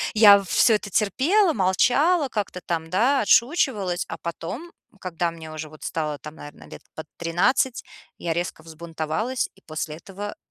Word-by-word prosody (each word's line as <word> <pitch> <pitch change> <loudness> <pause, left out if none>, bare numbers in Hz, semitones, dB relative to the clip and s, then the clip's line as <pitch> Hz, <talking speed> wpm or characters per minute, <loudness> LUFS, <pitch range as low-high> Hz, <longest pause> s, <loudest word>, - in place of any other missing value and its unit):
я 205 -2 +8
всё 225 +4 +3
это 210 -1 -4
терпела, 310 - +2
молчала, 270 - +2
как-то 205 -5 -4
там, 165 -1 -3
да, 245 +10 +2
отшучивалась, 215 - +2
а - - -5
потом, 195 - -6 0.3
когда 170 -1 -2
мне 160 -1 -10
уже 155 0 -7
вот 155 0 -14
стало 155 -2 -3
там, 150 +3 -10
наверное, 145 -2 -12
лет - - -11
под 160 - -7
13 230 +10 +1 0.3
я 170 - -2
резко 170 -1 -4
взбунтовалась, 165 +9 -3
и - - -23
после 155 -1 -5
этого 200 +4 -8
185 Hz, 155 wpm, -24 LUFS, 165-240 Hz, 0.3 s, я